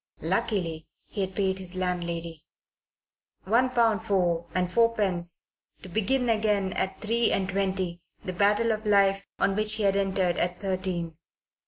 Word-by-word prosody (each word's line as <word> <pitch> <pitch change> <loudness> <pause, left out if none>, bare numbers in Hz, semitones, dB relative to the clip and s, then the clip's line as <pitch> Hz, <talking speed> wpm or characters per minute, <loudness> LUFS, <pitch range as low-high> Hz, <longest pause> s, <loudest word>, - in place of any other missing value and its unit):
Luckily 165 -7 -1 0.2
he 205 - -5
had 190 -1 -3
paid 190 -1 0
his 185 -1 -8
landlady. 170 -3 -3 1.0
One 235 +6 +2
pound 230 -3 +2
four 175 -5 0
and 180 0 +1
fourpence 190 -4 +1 0.3
to 185 - -9
begin 240 +7 0
again 210 -4 +1
at 190 0 -2
three 230 +2 +1
and 190 - +1
twenty 190 -2 -1 0.2
the 185 - -3
battle 210 +4 +2
of 215 0 -2
life 195 -1 +3
on 195 - +1
which 215 0 +4
he 220 - -2
had 195 -1 +3
entered 190 -3 0
at 180 0 -1
thirteen. 185 -4 -3
195 Hz, 150 wpm, -27 LUFS, 180-215 Hz, 1.0 s, which